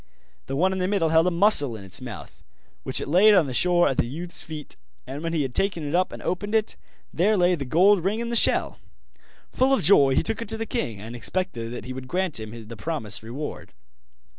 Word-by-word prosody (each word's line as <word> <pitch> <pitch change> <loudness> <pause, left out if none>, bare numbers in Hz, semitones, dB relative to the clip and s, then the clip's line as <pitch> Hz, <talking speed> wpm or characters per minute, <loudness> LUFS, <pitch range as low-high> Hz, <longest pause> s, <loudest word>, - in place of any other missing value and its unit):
The 135 - -3
one 185 +6 +2
in 190 - -3
the 180 - 0
middle 190 -5 +1
held 160 +2 +3
a - - +4
mussel 170 - +3
in 105 - -10
its 95 +6 -4
mouth, 120 -6 -10 0.4
which - - +1
it - - -5
laid 200 +8 +5
on 180 -5 +4
the 130 - -5
shore 175 +5 +3
at 135 - -1
the - - +1
youth's 170 +7 -4
feet, 155 -3 -8 0.3
and 135 +3 -7
when 165 0 -3
he 160 -3 0
had 130 -2 -5
taken 175 -4 -1
it 145 - -4
up 185 +1 +1
and - - -9
opened 205 +4 -2
it, 220 0 0 0.4
there 205 +5 +2
lay 180 0 +3
the 145 -6 -3
gold 180 +7 +4
ring 205 +4 -1
in 235 0 -3
the 235 - -2
shell. - - +3 0.7
Full 265 +1 +3
of - - -3
joy 140 -9 +5
he - - +2
took 225 +1 -3
it 230 - -6
to 225 - -4
the 225 - -3
king 120 - -4
and 115 +4 -8
expected 120 - -3
that 120 - -7
he 130 - -6
would 130 0 -8
grant 180 -3 -1
him 110 0 -9
the 115 - -9
promised 110 -4 -3
reward. 125 +7 -7
165 Hz, 240 wpm, -24 LUFS, 130-190 Hz, 0.7 s, laid